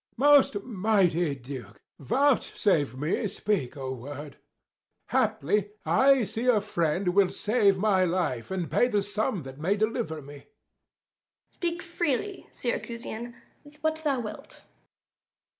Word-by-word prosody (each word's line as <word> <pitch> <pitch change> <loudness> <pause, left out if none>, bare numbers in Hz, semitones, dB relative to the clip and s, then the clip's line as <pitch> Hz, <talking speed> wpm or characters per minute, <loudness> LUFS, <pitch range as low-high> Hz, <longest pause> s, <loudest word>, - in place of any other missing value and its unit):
_ - - -66
Æge. - - -45
Most 275 -6 +5
mighty 185 - +1
Duke, 125 -5 -9 0.2
vouchsafe 195 - +1
me 155 - -1
speak 195 -8 -1
a 135 -2 -5
word: 140 +3 -8 0.7
Haply 205 +7 +1
I 270 -1 +4
see 225 +4 -3
a 240 -4 +5
friend 180 -2 0
will 190 +1 +4
save 205 -3 +2
my 190 -1 +3
life, 165 -9 -1
And 185 -3 -3
pay 245 - +4
the 210 -5 +1
sum 205 -3 -1
that 135 +1 -10
may 185 +6 +1
deliver 215 -6 -1
me. 145 +1 -10
Duke. 140 - -18 1.0
Speak 340 -1 -3
freely, 345 +2 -2
Syracusian, 235 -1 -4 0.5
what 315 0 0
thou 280 -4 +1
wilt. 215 - -9
200 Hz, 130 wpm, -27 LUFS, 155-240 Hz, 1.0 s, Most